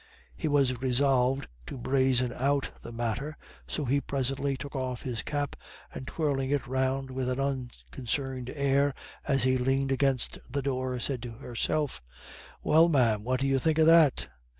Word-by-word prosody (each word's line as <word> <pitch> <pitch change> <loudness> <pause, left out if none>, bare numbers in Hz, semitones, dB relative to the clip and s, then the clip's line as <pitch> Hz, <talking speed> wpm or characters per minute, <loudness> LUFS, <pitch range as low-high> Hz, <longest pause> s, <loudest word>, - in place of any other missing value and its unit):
He - - -2
was 135 -4 +2
resolved 130 0 +2 0.2
to - - -6
brazen 130 -1 +2
out 140 +2 0
the - - -9
matter, 120 +6 -3 0.3
so 150 - -3
he 140 +3 +2
presently 135 0 -1
took 140 +2 -8
off 130 -2 -3
his 120 -4 -3
cap, 145 -2 -2 0.4
and 130 - -7
twirling 140 -4 -1
it 145 -1 0
round 130 +1 -1
with 130 -1 -2
an 130 +1 -1
unconcerned 130 -1 -3
air 140 0 +1 0.3
as 135 -3 +3
he 130 0 +3
leaned 135 +2 +1
against 135 -2 +1
the 140 -1 -2
door, 130 -2 -1
said 125 0 -2
to 120 -1 -6
Herself: 135 - -2 0.6
"Well, 165 +2 +5
ma'am, 115 -8 +3
what 130 +2 -1
do - - +1
you 135 0 +2
think 160 +3 +1
of 160 - +5
that?" 160 - +5
135 Hz, 165 wpm, -29 LUFS, 125-140 Hz, 0.6 s, Well